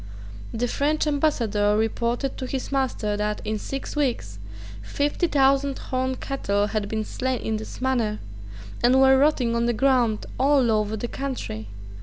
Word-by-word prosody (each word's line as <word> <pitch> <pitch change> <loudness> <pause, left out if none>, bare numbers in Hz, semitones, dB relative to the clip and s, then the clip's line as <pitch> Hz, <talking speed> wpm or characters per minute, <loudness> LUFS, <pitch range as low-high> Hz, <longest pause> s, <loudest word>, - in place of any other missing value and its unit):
The 240 +2 -1
French 295 +5 0
ambassador 230 -9 +1
reported 235 +4 -1
to 260 - -3
his 265 +1 -4
master 260 -6 0
that, 210 0 -1
in 215 0 -2
six 275 +6 -5
weeks, 235 - -1 0.4
fifty 290 - 0
thousand 275 -1 +2
horned 260 0 -2
cattle 205 -7 0
had 210 -1 -2
been 220 -1 -1
slain 260 +1 -2
in 220 -1 -1
this 220 - -8
manner, 240 -5 0 0.7
and 250 +2 +5
were 265 0 +6
rotting 265 -5 +2
on 235 0 +1
the 240 - +2
ground 245 -3 +2
all 270 -3 +4
over 215 0 0
the 240 - -3
country. 245 - -5
245 Hz, 155 wpm, -24 LUFS, 215-270 Hz, 0.7 s, were